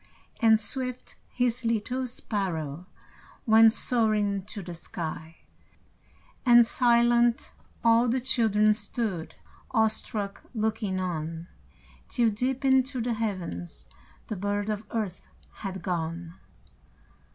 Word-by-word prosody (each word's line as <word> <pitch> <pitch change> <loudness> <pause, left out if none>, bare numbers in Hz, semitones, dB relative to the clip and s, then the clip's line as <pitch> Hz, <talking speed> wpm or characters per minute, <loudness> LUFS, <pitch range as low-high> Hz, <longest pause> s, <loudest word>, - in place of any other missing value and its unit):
And 225 -2 +5
swift, 255 +3 -3 0.2
His 245 0 0
little 235 +3 -1
sparrow 180 - -4 0.6
Went 225 -1 +7
soaring 215 -4 +1
to 210 -1 -6
the 175 0 -7
sky, 165 -1 -7 1.0
And 240 -2 +7
silent, 240 +1 +3 0.3
all 230 +1 +5
the 245 +3 +1
children 220 -4 +3
Stood, 205 -5 -2 0.3
awestruck, 215 -2 -1
looking 215 -3 -1
on, 165 -1 -4 0.6
Till, 235 -3 +2
deep 255 +5 -1
into 265 0 +3
the 235 +1 -1
heavens, 185 - -4 0.4
The 215 - -3
bird 205 +2 -2
of 210 +1 -4
earth 210 -6 -4 0.3
had 190 -3 -6
gone. 170 -1 -3
215 Hz, 105 wpm, -27 LUFS, 185-235 Hz, 1.0 s, Went